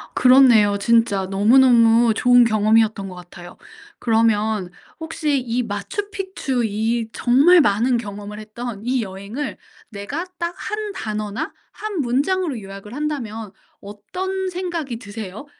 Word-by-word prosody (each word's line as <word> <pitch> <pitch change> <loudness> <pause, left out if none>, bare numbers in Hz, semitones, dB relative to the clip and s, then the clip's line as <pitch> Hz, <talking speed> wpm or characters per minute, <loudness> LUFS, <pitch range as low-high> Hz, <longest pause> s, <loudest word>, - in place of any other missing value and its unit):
그렇네요. 245 -6 +5
진짜 225 -2 +2
너무너무 230 +2 +5
좋은 245 +2 +5
경험이었던 215 -2 +2
것 185 - -10
같아요. 175 0 -12 0.4
그러면 220 -4 +1 0.3
혹시 310 -3 -1
이 245 0 -2
마추픽추 330 - -4
이 220 +2 -1
정말 290 +8 +5
많은 240 +1 +2
경험을 210 -1 -7
했던 215 0 -7
이 255 0 0
여행을 200 +7 -6 0.3
내가 230 - -5
딱 340 0 -2
1 425 -1 -4
단어나 215 - -4 0.2
1 420 -6 -4
문장으로 285 +3 0
요약을 195 +2 -10
한다면 240 -8 -4 0.3
어떤 370 - -5
생각이 345 -9 -4
드세요? 210 +1 -8
230 Hz, 265 characters per minute, -21 LUFS, 210-285 Hz, 0.4 s, 그렇네요